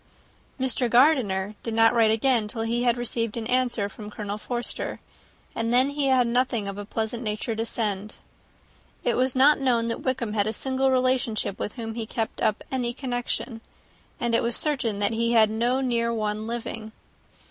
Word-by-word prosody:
Mr. 255 -1 +1
Gardiner 230 -7 +3
did 230 -1 -4
not 225 +1 +5
write 230 -2 +4
again, 225 0 +2
till 225 +1 -3
he 235 +1 0
had 240 -1 +2
received 230 -2 -2
an 225 - -3
answer 245 -4 +1
from 210 +1 -9
Colonel 210 0 -5
Forster; 240 +2 -1 0.5
and 230 0 -2
then 255 +3 +4
he 285 -1 -1
had 260 -2 +4
nothing 235 -3 0
of 200 0 -5
a 205 - -6
pleasant 225 +2 -3
nature 215 0 -3
to 225 - -1
send. 210 -3 -2 0.9
It 240 - +1
was 255 +1 +1
not 285 +4 +5
known 240 -4 +1
that 230 - -3
Wickham 255 -5 -1
had 205 -1 +1
a 220 - -1
single 265 +3 0
relation 255 -3 +1 0.2
with 210 - -3
whom 225 -3 -5
he 225 -1 -4
kept 225 -1 -3
up 215 - +1
any 245 -2 -1
connection, 245 -2 -3 0.6
and 235 -1 -1
it 230 - +3
was 235 0 0
certain 260 -9 0
that 205 +2 +1
he 230 +1 +1
had 220 -2 +5
no 240 +4 +1
near 235 -2 0
one 215 -1 -2
living. 225 -2 -5
235 Hz, 185 wpm, -25 LUFS, 220-250 Hz, 0.9 s, not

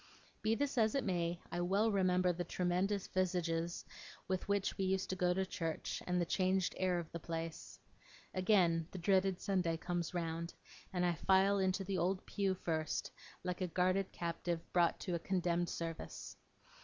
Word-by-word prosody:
Be 220 +1 +2
this 280 0 0
as 220 +1 +3
it 275 - +1
may, 175 -3 0
I 175 - -1
well 200 +5 +3
remember 185 -2 +3
the 175 +1 -2
tremendous 185 +3 0
visages 175 -2 -1 0.4
with 185 -1 -1
which 200 -1 +1
we 195 - 0
used 190 0 0
to - - -1
go 180 -1 +2
to 190 +2 +1
church, 165 -3 -3
and 180 0 +2
the 175 - +2
changed 185 +1 +1
air 185 -1 +2
of 170 -2 -5
the 170 - -4
place. 165 0 -5 0.6
Again, 180 -4 +3
the - - -7
dreaded 190 +1 +2
Sunday 180 -5 +1
comes 175 0 -2
round, 170 0 -2 0.4
and 180 -2 +1
I 175 - +3
file 190 +4 +4
into 190 +1 +1
the 190 -1 -1
old 185 +2 0
pew 195 -2 0
first, 160 -4 -2 0.3
like 180 0 -3
a 185 - +1
guarded 185 +2 +1
captive 170 0 -2
brought 175 -1 +3
to 180 - -2
a 170 - 0
condemned 175 -1 0
service. 165 -1 -5
180 Hz, 175 wpm, -36 LUFS, 170-190 Hz, 0.6 s, file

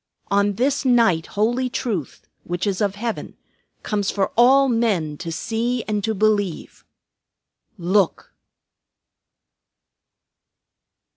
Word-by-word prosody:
On 200 0 +2
this 265 +7 0
night 230 -11 +3
holy 240 +5 0
Truth, 215 - -4 0.2
which 175 +2 -3
is 200 0 -1
of 200 -1 0
Heaven, 225 +2 -5 0.5
comes 205 -2 -1
for 195 -2 -1
all 265 +4 +5
men 210 - 0
to 165 +1 -6
see 230 +6 -2
and 210 -1 -2
to 220 +1 -1
believe. 205 -4 -1 0.9
Look!" 185 +1 0
210 Hz, 100 wpm, -22 LUFS, 190-235 Hz, 0.9 s, all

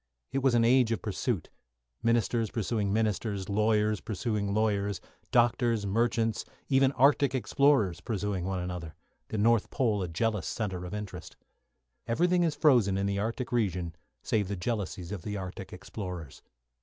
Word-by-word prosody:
It 135 +2 0
was 130 -2 +3
an 115 -1 +4
age 125 -1 +4
of 115 - -2
pursuit; 105 - -2 0.5
ministers 115 -1 +1
pursuing 105 -2 -1
ministers, 105 -2 -1
lawyers 105 0 +2
pursuing 105 -1 -2
lawyers, 100 -2 0 0.3
doctors, 120 -2 +2
merchants, 115 +2 +1 0.3
even 135 -1 +4
Arctic 135 0 +4
explorers 125 -9 +2
pursuing 100 -3 -2
one 95 0 -2
another, 90 -3 -5 0.3
the 110 - -4
North 115 +1 +3
Pole 110 -6 +1
a 90 - -2
jealous 105 +4 -1
centre 95 -5 -3
of 90 - -5
interest. 95 -5 -7 0.7
Everything 175 +9 +2
is 165 -3 +1
frozen 120 - +4
in 100 - 0
the 100 0 0
Arctic 115 +4 -3
region 90 -8 -1 0.3
save 105 -3 0
the 100 - -3
jealousies 95 -3 -3
of 100 -4 -4
the 105 +3 -4
Arctic 95 0 -7
explorers. 90 -5 -7
105 Hz, 150 wpm, -29 LUFS, 95-120 Hz, 0.7 s, an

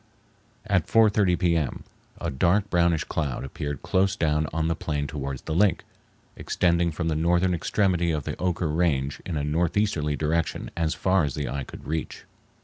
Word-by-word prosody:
At - - +1
4:30 105 -5 +4
p.m. 85 -6 0 0.4
a - - -2
dark 90 +9 +1
brownish 85 -3 +3
cloud 70 -6 -3
appeared 70 +1 -5
close 95 +1 +2
down 75 -1 +1
on 80 0 0
the 85 - +1
plain 75 -2 -2
towards 70 -2 -5
the 80 - -3
lake, 100 +4 +3 0.5
extending 85 -1 +1
from 80 +1 -3
the 80 - 0
northern 85 +3 +2
extremity 90 0 +1
of 75 -3 -1
the - - -4
Oquirrh 85 -3 -1
Range 70 -5 0
in 85 -4 -2
a 70 - -1
northeasterly 80 0 0
direction 80 +2 -1
as 80 -1 0
far 95 +3 +2
as 70 -4 -2
the 75 -3 -3
eye 65 +2 -3
could - - -11
reach. 80 +2 -4
80 Hz, 170 wpm, -25 LUFS, 75-90 Hz, 0.5 s, 4:30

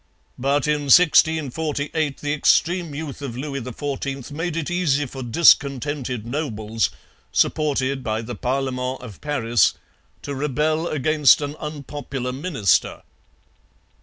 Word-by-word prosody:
But 140 +2 +1
in 150 -1 0
1648 155 -2 +3
the 145 0 -1
extreme 170 +1 +2
youth 145 -2 -6
of 125 -4 -5
Louis 140 0 -4
XIV 135 +2 -5
made 165 +2 -3
it 165 +1 -3
easy 150 -5 +1
for 135 0 -8
discontented 135 -2 +2
nobles, 115 -5 -2 0.4
supported 135 -3 +1
by 110 -1 -2
the 120 +2 -6
Parlement 130 +2 -2
of 115 -6 -11
Paris, 120 - +2 0.5
to 145 - -4
rebel 150 +4 0
against 150 -1 +4
an 145 0 -4
unpopular 140 -4 -5
minister. 135 - 0
140 Hz, 115 wpm, -22 LUFS, 125-150 Hz, 0.5 s, against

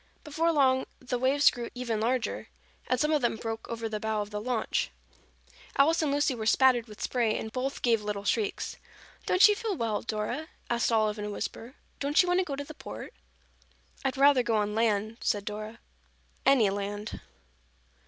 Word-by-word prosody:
Before 325 +2 +1
long 260 -4 +3
the 250 -1 -3
waves 275 +3 +5
grew 240 -2 -6
even 235 -3 -2
larger 245 +1 -1 0.4
and 255 - +1
some 300 +2 +2
of 300 -2 +2
them 240 -2 +1
broke 225 0 -5
over 230 -1 -3
the 215 -1 -3
bow 220 -1 -1
of 205 - -12
the 210 0 -3
launch. 240 -1 -1 0.9
Alice 320 +5 +4
and 300 -3 +1
Lucy 285 -1 +2
were 220 -3 -4
spattered 245 -1 +4
with 210 -1 -9
spray 235 -4 +1
and 220 - -5
both 260 +3 -3
gave 230 -3 +3
little 205 -1 -3
shrieks. 210 0 -1 0.5
"Don't 365 +3 +7
you 420 - +4
feel 435 -2 -2
well, 225 -3 -1
Dora?" 230 +8 -3 0.2
asked 235 0 +1
Olive 215 -1 +2
in 210 - -3
a - - -4
whisper. 230 +4 -6 0.2
"Don't 285 +2 +1
you - - -3
want 355 +1 +3
to - - +3
go 280 - -3
to 285 - -4
the 310 - -10
Port?" - - -9 0.9
"I'd 270 -1 -1
rather 275 -1 +6
go 235 -2 0
on 210 -1 0
land," 220 0 +1
said 205 -1 0
Dora. 215 +2 -6 0.7
"Any 245 -8 +5
land." 205 +1 -4
235 Hz, 190 wpm, -29 LUFS, 215-275 Hz, 0.9 s, Don't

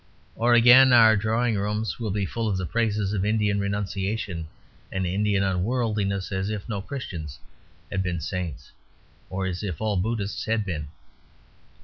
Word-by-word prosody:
Or 120 +1 +3
again, 125 +3 +8
our 110 -2 +7
drawing 110 +2 +1
rooms 105 +3 -2
will 115 -2 -2
be 100 0 -1
full 115 +4 -3
of 100 -3 0
the 95 - -2
praises 105 -1 0
of 95 -2 0
Indian 105 -1 +1
renunciation 100 -3 -3 0.4
and 95 -1 -1
Indian 100 +2 +1
unworldliness, 100 0 -1
as 95 +1 -2
if 105 -2 -4
no 105 -4 -3
Christians 90 - -6 0.5
had 95 - 0
been 90 -2 -2
saints, 85 -4 -5 0.6
or 95 +1 -3
as 90 -1 -3
if 95 -7 -4
all 105 -2 0
Buddhists 105 +1 -2
had 110 -1 0
been. 80 -6 -4
100 Hz, 155 wpm, -25 LUFS, 95-110 Hz, 0.6 s, again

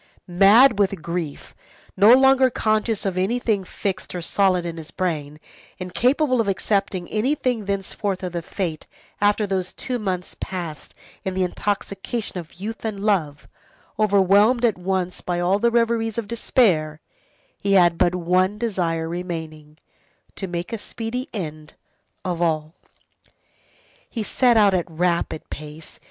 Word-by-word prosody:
Mad 200 +7 +6
with 195 -4 +1
grief, 170 -3 -5 0.4
no 210 +5 +7
longer 265 0 +5
conscious 215 -2 0
of 185 -2 -1
anything 215 0 0
fixed 190 0 -4
or 175 - -3
solid 185 -1 +2
in 170 -1 -5
his 160 0 -8
brain, 155 -5 -3 0.4
incapable 250 - +1
of 220 - -3
accepting 195 -2 -1
anything 250 -1 0
thenceforth 195 0 -3
of 175 -2 -3
fate 165 -3 -4 0.3
after 205 +1 +3
those 190 -2 -2
two 250 -2 -4
months 185 -4 -3
passed 170 -5 -6 0.3
in 190 -1 -3
the 190 - +1
intoxication 200 +2 -3
of 165 -2 -11
youth 210 +5 -6
and 215 -3 -3
love, 165 -9 0 0.5
overwhelmed 205 +4 +4
at 225 - +2
once 180 0 -2
by 175 -1 -2
all 180 +3 +2
the 235 +2 +3
reveries 230 -1 +1
of 230 -3 -3
despair, 180 -10 +1 0.6
he 200 0 0
had 175 -3 +4
but 175 +1 +3
one 185 +3 +1
desire 175 -8 -1
remaining, 160 -3 -6 0.6
to 195 - -5
make 175 +4 -4
a 225 - -3
speedy 240 +4 -5
end 155 -6 -6 0.5
of 175 -2 -2
all. 155 -2 0 1.4
He 225 - -3
set 240 +2 +3
out 205 -2 +5
at 180 -1 0
rapid 170 -1 -1
pace. 155 +1 -9
190 Hz, 140 wpm, -22 LUFS, 175-215 Hz, 1.4 s, no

